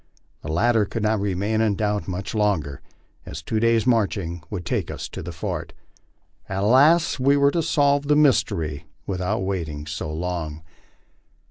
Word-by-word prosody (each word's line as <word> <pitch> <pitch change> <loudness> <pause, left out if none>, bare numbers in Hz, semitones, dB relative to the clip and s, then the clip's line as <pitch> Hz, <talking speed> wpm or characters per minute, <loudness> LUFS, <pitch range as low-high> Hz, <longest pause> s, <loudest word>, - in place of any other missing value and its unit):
The 80 - -5
latter 110 +5 +3
could 110 +2 -4
not 110 0 +2
remain 100 +3 0
in 110 -3 +2
doubt 105 0 -1
much 95 +1 -4
longer, 95 - 0 0.4
as 75 +3 -8
two 110 +6 -1
days' 115 0 +3
marching 100 -8 0
would 90 -5 -5
take - - -1
us - - -5
to - - -7
the 85 - -6
fort. 80 - -5 0.8
Alas! 135 - +4
we 140 +2 +4
were 140 0 +4
to 170 - 0
solve 145 -2 +2
the 150 - +4
mystery 85 - +2 0.2
without 95 +2 -2
waiting 80 -6 -3
so 80 0 -5
long. 80 -2 -4
100 Hz, 155 wpm, -23 LUFS, 85-115 Hz, 0.8 s, Alas